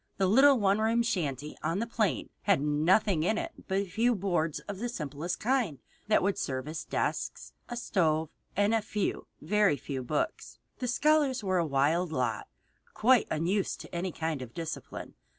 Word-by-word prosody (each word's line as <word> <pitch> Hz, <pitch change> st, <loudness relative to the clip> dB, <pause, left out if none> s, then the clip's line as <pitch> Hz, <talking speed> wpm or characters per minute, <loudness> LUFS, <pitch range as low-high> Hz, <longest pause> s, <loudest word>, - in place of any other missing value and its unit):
The 195 Hz, -, +2 dB
little 270 Hz, +8 st, +6 dB
one 200 Hz, 0 st, +3 dB
room 225 Hz, +2 st, +2 dB
shanty 150 Hz, -, -2 dB
on 165 Hz, -, -1 dB
the 225 Hz, -, 0 dB
plain 230 Hz, -3 st, -1 dB
had 200 Hz, -5 st, +3 dB
nothing 155 Hz, +5 st, +2 dB
in 215 Hz, +7 st, +1 dB
it -, -, -3 dB, 0.2 s
but 190 Hz, -, 0 dB
a 200 Hz, -, +1 dB
few 230 Hz, +6 st, +1 dB
boards 175 Hz, -5 st, 0 dB
of 200 Hz, -2 st, -7 dB
the 240 Hz, +2 st, -2 dB
simplest 155 Hz, -, -4 dB
kind 235 Hz, -, +1 dB, 0.3 s
that 215 Hz, -, +3 dB
would 200 Hz, +1 st, 0 dB
serve 130 Hz, 0 st, -3 dB
as 155 Hz, 0 st, -4 dB
desks, -, -, -2 dB, 0.2 s
a 240 Hz, -, -4 dB
stove, 160 Hz, -9 st, +1 dB, 0.3 s
and 205 Hz, +2 st, +3 dB
a 225 Hz, -, +3 dB
few, 210 Hz, -1 st, -2 dB
very 210 Hz, -7 st, +3 dB
few, 135 Hz, -2 st, -5 dB
books. 145 Hz, -, -3 dB, 0.2 s
The 250 Hz, -, -2 dB
scholars 285 Hz, -1 st, +2 dB
were 185 Hz, -2 st, +1 dB
a 170 Hz, -, +1 dB
wild 155 Hz, +5 st, +1 dB
lot, 125 Hz, -6 st, -1 dB, 0.5 s
quite 245 Hz, +1 st, +4 dB
unused 180 Hz, +6 st, 0 dB
to -, -, -12 dB
any 175 Hz, +2 st, -2 dB
kind 160 Hz, -3 st, -3 dB
of 120 Hz, -2 st, -9 dB
discipline. 165 Hz, -1 st, -6 dB
190 Hz, 180 wpm, -30 LUFS, 155-220 Hz, 0.5 s, little